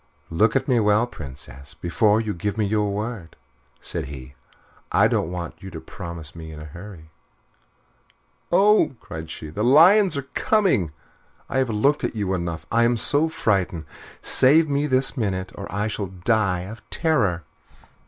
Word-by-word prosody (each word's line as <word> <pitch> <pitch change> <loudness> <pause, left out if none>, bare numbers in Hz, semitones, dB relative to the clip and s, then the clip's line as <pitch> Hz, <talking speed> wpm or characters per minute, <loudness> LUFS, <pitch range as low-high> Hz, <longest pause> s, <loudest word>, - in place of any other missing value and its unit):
"Look 105 +9 +2
at 135 0 +1
me 125 -3 +3
well, 105 +2 +3
Princess, 70 - -10
before 105 +5 +2
you 110 -2 -2
give 100 +4 -3
me 110 - +1
your 105 0 0
word," 105 -5 -5 0.4
said - - -4
he. 65 -1 -9 0.6
"I - - +5
don't 80 - 0
want 85 -2 -6
you 95 - -8
to 80 -3 -8
promise 85 -1 -8
me 80 -1 -9
in 75 - -9
a 75 - -8
hurry." 85 0 -11 1.4
"Oh!" 195 -4 +4
cried 80 0 -8
she, 80 -2 -7
"the 105 +7 -2
lions 175 - +6
are 140 - -4
coming. 190 - +2 0.6
I 130 - -1
have 130 -2 +1
looked 135 +8 +1
at - - -2
you 100 -3 -1
enough. 85 -3 -3
I 115 - +3
am 120 0 +3
so 145 +7 +2
frightened. 95 - -1 0.4
Save 155 +5 +4
me 145 +1 0
this 130 0 +2
minute, 95 -6 -2
or - - -8
I 105 +2 -1
shall 105 -2 -3
die 95 0 0
of 105 +6 -9
terror." 110 - +1
105 Hz, 165 wpm, -23 LUFS, 85-130 Hz, 1.4 s, lions